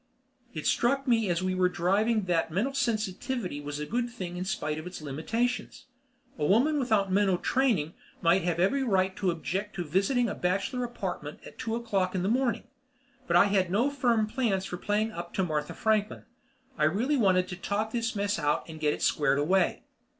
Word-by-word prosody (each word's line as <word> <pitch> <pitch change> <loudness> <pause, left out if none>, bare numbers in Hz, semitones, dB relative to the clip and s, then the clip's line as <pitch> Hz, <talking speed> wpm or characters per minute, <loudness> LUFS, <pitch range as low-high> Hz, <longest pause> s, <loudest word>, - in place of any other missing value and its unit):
It 155 - -5
struck 275 +3 +1
me 225 -5 +3
as 175 +1 0
we 185 0 0
were 185 0 +2
driving 205 +6 +1
that 170 -3 0
mental 210 - -1
sensitivity 215 - -2
was 145 0 -5
a 150 - -3
good 240 +6 -1
thing 185 -7 -6
in 180 +1 -3
spite 155 -5 -2
of 155 - -7
its 180 - -7
limitations. 160 - -2 0.5
A - - -1
woman 280 +9 +3
without 215 -7 +1
mental 195 -1 +3
training 205 - +1 0.3
might 170 +3 +3
have 170 0 -1
every 235 +10 +2
right 190 -6 +1
to 190 - 0
object 185 +5 -3
to 175 - -2
visiting 195 - +1
a 205 - -2
bachelor 195 +8 -1
apartment 190 -10 -5
at - - -13
two 225 0 -2
o'clock 195 -6 -1
in 180 - 0
the 190 - +1
morning. 240 -1 +1 0.6
But 170 - +1
I 175 - +7
had 195 -3 +2
no 235 +10 +2
firm 240 -5 +2
plans 215 -5 -1
for 180 - -5
playing 210 +4 0
up 175 -3 -7
to 190 - +1
Martha 150 -4 -2
Franklin; 215 -1 0 0.6
I - - +4
really 225 - +1
wanted 185 -7 +3
to 180 - -4
talk 205 +4 -2
this 235 0 -2
mess 205 +1 0
out 145 0 0
and 160 -1 -9
get 150 -1 +1
it - - -6
squared 145 -2 +2
away. 175 +5 +1
195 Hz, 195 wpm, -28 LUFS, 175-230 Hz, 0.6 s, I